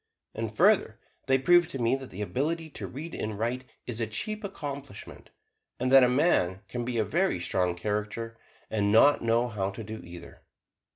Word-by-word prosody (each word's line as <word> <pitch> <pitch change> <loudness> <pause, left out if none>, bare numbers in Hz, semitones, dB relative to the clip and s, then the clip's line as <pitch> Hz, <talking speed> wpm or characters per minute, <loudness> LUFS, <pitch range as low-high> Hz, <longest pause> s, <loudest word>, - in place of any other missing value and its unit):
And 110 -1 -5
further, 185 - +4 0.3
they 130 0 +4
proved 175 +5 +4
to 135 - -5
me 120 +2 +2
that 135 -1 -10
the 100 +3 -5
ability 160 +8 -2
to - - -6
read 155 +5 -7
and 110 -1 -4
write 120 +4 -2 0.2
is 120 -1 -4
a 115 - 0
cheap 215 - -3
accomplishment, 140 - -7 0.5
and 130 +1 0
that 135 -1 +9
a 125 - +5
man 125 - +2
can 120 -1 -4
be 120 0 -3
a 110 - +2
very 175 - +1
strong 90 0 0
character, 105 +4 -3 0.4
and 105 -2 +1
not 140 +7 +6
know 115 +1 +2
how 100 -4 -2
to 100 +3 -7
do 110 +1 -7
either. 85 0 -11
120 Hz, 185 wpm, -28 LUFS, 105-140 Hz, 0.5 s, that